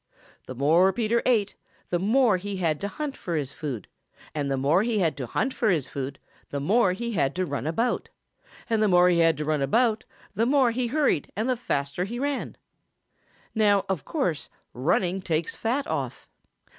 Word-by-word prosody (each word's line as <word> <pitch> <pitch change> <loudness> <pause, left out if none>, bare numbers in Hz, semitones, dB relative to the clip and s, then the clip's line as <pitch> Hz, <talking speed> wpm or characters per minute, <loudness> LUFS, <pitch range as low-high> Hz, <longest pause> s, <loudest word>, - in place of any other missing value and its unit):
The 130 - -6
more 165 +8 +4
Peter 235 +2 +1
ate, 215 -5 +2 0.4
the 175 - 0
more 220 +1 +3
he 200 +1 -5
had 160 -5 0
to 200 - -1
hunt 285 +6 -5
for 170 - -4
his 140 -4 -2
food; 135 - -5 0.5
and 145 -2 -2
the 135 - 0
more 145 +8 +3
he 225 0 0
had 170 -6 +1
to 130 -3 -4
hunt 260 - -1
for 225 - +1
his 155 -8 0
food, 135 0 -5 0.3
the 140 - -3
more 190 +6 +3
he 235 +5 -4
had 140 -9 0
to 185 0 0
run 140 -2 -3
about; 230 +10 -1 0.6
and 225 -1 +1
the 215 - +4
more 180 -1 +5
he 175 -1 +3
had 165 -2 +4
to 150 - -3
run 155 -1 0
about, 220 - +2 0.3
the 225 +4 +1
more 265 -3 +4
he 245 +1 -1
hurried 280 - +1
and 220 +5 -1
the 255 - +2
faster 140 - -2
he 235 +5 -5
ran. 280 +2 -3 1.0
Now, 205 -3 +3
of 190 -6 -2
course 180 - -2 0.2
running 175 +8 0
takes 165 -2 -1
fat 255 +6 -1
off. - - -4
185 Hz, 195 wpm, -26 LUFS, 155-230 Hz, 1.0 s, more